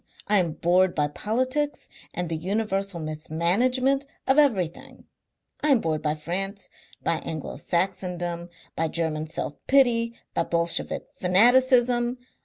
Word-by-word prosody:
I 210 0 +4
am 170 -4 0
bored 180 +3 +2
by 150 -1 +1
politics 255 - -1 0.2
and 180 0 -3
the 165 - -2
universal 195 +1 -2
mismanagement 185 - +1 0.2
of 265 +3 +4
everything. 195 - 0 0.6
I - - +1
am 275 -5 +5
bored 160 -5 -1
by 150 0 0
France, 195 +6 -4 0.3
by 165 - +1
Anglo 160 -4 -6
Saxondom, 175 0 -2 0.3
by 165 - 0
German 155 -1 -2
self 155 -2 -4
pity, 235 -4 +3 0.2
by - - 0
Bolshevik 170 0 0
fanaticism. 245 +5 +4
185 Hz, 125 wpm, -25 LUFS, 165-240 Hz, 0.6 s, am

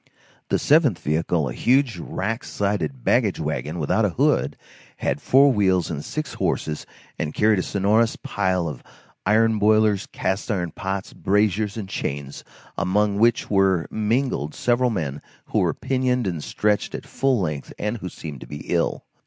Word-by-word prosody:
The - - +2
seventh 145 - +4
vehicle, 80 0 0
a - - -4
huge 125 - +2
rack 110 +8 -3
sided 85 -11 -2
baggage - - +2
wagon, 75 +7 -3
without 75 -4 +1
a - - +3
hood, 70 +2 +1 0.4
had - - -1
four 135 +1 +5
wheels 95 -5 +2
and 75 -2 -4
six 155 -3 -4
horses, 75 -1 -2 0.3
and 75 -1 -3
carried 105 -2 +3
a - - +2
sonorous 105 +5 +2
pile 95 -4 -1
of 75 -6 -6 0.5
iron 110 +1 +3
boilers, 110 -1 +3
cast 95 +5 -2
iron 90 -6 -1
pots, 95 +1 -4
braziers, 105 +1 +1
and 105 -4 -4
chains, 70 -6 -4 0.4
among 100 +2 +1
which 115 0 +2
were 95 -4 +3
mingled 110 - -1
several 125 +1 +2
men 75 - -3 0.3
who - - +1
were - - +1
pinioned 125 -2 0
and 85 -5 -3
stretched 105 -1 0
at - - -7
full 135 -3 +1
length, 75 -6 -3
and 105 +3 -2
who 95 -4 -6
seemed 75 -6 -8
to - - -9
be 75 - -7
ill. - - 0
100 Hz, 160 wpm, -23 LUFS, 80-110 Hz, 0.5 s, four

